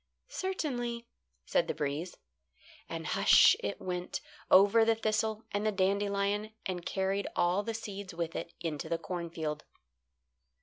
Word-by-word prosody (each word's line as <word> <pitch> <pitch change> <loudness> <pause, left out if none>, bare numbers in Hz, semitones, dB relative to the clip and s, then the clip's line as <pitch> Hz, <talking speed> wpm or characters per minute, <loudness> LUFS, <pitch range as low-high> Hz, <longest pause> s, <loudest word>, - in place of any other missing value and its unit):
"Certainly," 245 -11 -3 0.4
said - - +1
the - - -2
breeze. 150 +5 -3 0.7
And - - -5
hush! - - +6
it 100 - -3
went 180 -1 -3 0.3
over 205 +4 +7
the 225 0 +3
thistle 220 0 -1
and 205 +1 -1
the 215 - +2
dandelion 200 +2 0
and 180 -2 -3
carried 195 +2 -1
all 175 +3 +2
the 225 +2 -4
seeds 200 -3 -6
with 165 -1 -4
it - - -4
into 160 -4 -4
the 165 - +1
cornfield. 165 -4 -4
200 Hz, 135 wpm, -31 LUFS, 175-220 Hz, 0.7 s, over